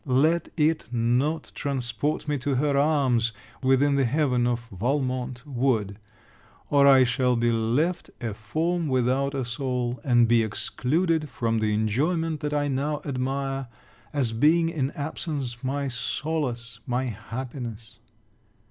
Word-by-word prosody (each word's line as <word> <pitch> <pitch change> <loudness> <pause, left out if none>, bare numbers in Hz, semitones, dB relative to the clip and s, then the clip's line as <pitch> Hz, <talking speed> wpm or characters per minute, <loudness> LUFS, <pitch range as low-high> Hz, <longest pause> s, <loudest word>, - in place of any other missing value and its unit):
Let 155 +6 +3
it 155 -5 +1
not 125 +7 0
transport 140 +2 -2
me 145 -1 0
to 135 +1 -1
her 140 +2 +1
arms, 135 -6 +2 0.3
within 135 +2 +3
the 135 - +3
heaven 125 -2 +2
of 120 -1 -2
Valmont 125 +3 -2
wood! 120 -7 0 0.7
or 140 -1 +6
I 135 -2 +8
shall 125 +1 +2
be 120 0 +2
left 125 +11 0
a 115 -3 -3
form 160 - -1
without 130 +2 +1
a 130 -2 -1
soul; 125 -1 -2
and 120 -3 +4
be 115 0 +4
excluded 150 - 0
from 115 -2 -1
the 110 -1 +1
enjoyment 155 - 0
that 150 -1 -3
I 145 -1 +1
now 145 +2 -1
admire, 135 0 -2 0.4
as 135 -6 +1
being 160 +8 +3
in 140 -5 -1
absence 140 -4 -4
my 140 +2 -1
solace, 120 -3 -3
my 125 +1 0
happiness. 115 -1 -6
130 Hz, 135 wpm, -26 LUFS, 120-145 Hz, 0.7 s, I